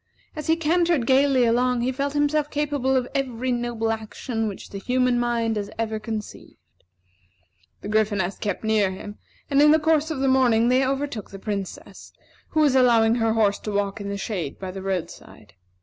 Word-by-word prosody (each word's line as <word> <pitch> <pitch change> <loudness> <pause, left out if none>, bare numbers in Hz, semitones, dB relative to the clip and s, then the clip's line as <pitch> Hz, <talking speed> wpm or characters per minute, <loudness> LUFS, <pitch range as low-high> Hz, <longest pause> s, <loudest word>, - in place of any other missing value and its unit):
As 305 - -6
he 320 - +4
cantered 335 -3 +1
gayly 265 -1 +4
along, 245 +1 +2
he 250 +2 0
felt 280 +2 -2
himself 295 0 +1
capable 285 -3 0
of 255 -1 +1
every 255 -2 -2
noble 240 -2 -1
action 225 +1 -4
which 200 - -8
the 200 - -6
human 250 +2 +1
mind 230 -2 0
has 205 -1 -4
ever 220 -1 -2
conceived. 215 -1 -7 1.2
The - - -7
Gryphoness 205 -3 0
kept 205 0 -3
near 215 -3 +2
him, 205 +2 -8 0.3
and 280 -1 +3
in 300 - +7
the 310 - +6
course 315 0 +1
of 315 -4 -3
the 270 - +1
morning 245 -3 +3
they 255 +1 +3
overtook 270 -5 -3
the 195 - -9
Princess, 200 -1 -6 0.4
who 310 - +1
was 290 -3 +4
allowing 230 -3 +4
her 225 0 +2
horse 210 -3 +2
to 210 - -5
walk 200 0 -2
in 200 - -5
the 200 - -3
shade 190 -8 -4
by 190 -1 -6
the 190 +1 -7
roadside. 190 -3 -6
240 Hz, 185 wpm, -24 LUFS, 210-275 Hz, 1.2 s, in